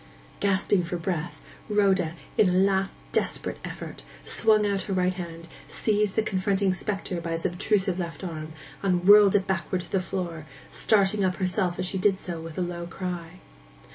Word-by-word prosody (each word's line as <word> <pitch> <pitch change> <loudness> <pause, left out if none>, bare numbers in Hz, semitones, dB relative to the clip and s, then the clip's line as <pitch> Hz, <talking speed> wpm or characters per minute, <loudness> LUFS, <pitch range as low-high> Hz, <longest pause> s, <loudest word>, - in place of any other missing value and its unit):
Gasping 200 -1 +2
for 170 +1 -3
breath, 175 -1 -3 0.3
Rhoda, 190 -5 +2 0.2
in 210 -4 +5
a - - +1
last 195 +1 +2 0.2
desperate - - -1
effort, - - -7 0.2
swung 215 -2 +3
out 200 -1 0
her - - 0
right 185 0 +2
hand, 170 -2 -7 0.2
seized 210 -2 +1
the 220 - +2
confronting 195 -1 +1
spectre 195 -2 -3
by 165 0 -3
its 165 - -3
obtrusive 190 +1 +1
left 170 +1 -5
arm, 160 -3 -5 0.3
and 180 -2 +1
whirled 205 -1 +8
it 195 -2 +3
backward 185 -1 -1
to - - -12
the 195 - +2
floor, 170 -4 -4 0.2
starting 200 -1 +2
up 185 -1 +1
herself 185 -1 0
as 185 - -1
she 190 +1 -2
did 195 0 +3
so 175 -3 -5
with 165 -1 -8
a - - 0
low 175 -1 -3
cry. 180 -1 -6
185 Hz, 175 wpm, -26 LUFS, 175-200 Hz, 0.3 s, whirled